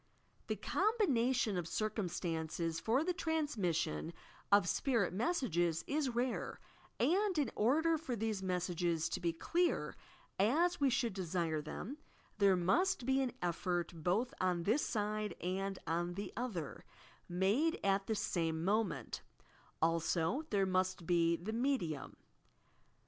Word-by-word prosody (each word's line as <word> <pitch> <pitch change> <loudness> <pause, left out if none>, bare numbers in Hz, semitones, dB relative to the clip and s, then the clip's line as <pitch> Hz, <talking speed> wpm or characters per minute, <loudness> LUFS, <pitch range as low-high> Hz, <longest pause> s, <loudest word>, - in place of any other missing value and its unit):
The - - 0
combination 260 - +1
of 175 -2 -2
circumstances 165 -5 -2
for 235 - +2
the 360 +2 0
transmission 215 - -1 0.4
of 200 -3 +6
spirit 230 -4 +1
messages 185 - +1
is 280 -4 -1
rare, 245 +1 -1 0.4
and, 385 +1 +2
in 280 -6 +1
order 315 +8 +3
for 265 -6 -3
these 220 -2 -2
messages 175 -3 0
to - - -2
be 170 -1 0
clear, 340 - 0 0.4
as 315 - +3
we 275 - +5
should 240 -4 +1
desire 170 -4 -1
them 220 - -6 0.2
— - - -32
there 200 -2 +6
must 295 - +2
be 265 +1 +3
an 255 -3 -1
effort 175 0 -1
both 180 +9 0
on 180 -2 +1
this 225 - +2
side 210 -1 -1
and 195 +2 -2
on 175 +1 -1
the 200 +2 -5
other, 210 - -4 0.5
made 200 - +2
at 195 0 +2
the 220 - 0
same 165 -4 -1
moment, 195 - 0 0.6
also 165 - +1
there 200 -2 +2
must 185 -2 0
be 170 -1 +3
the 180 +7 -5
"medium." 230 - -1
200 Hz, 135 wpm, -36 LUFS, 175-260 Hz, 0.6 s, of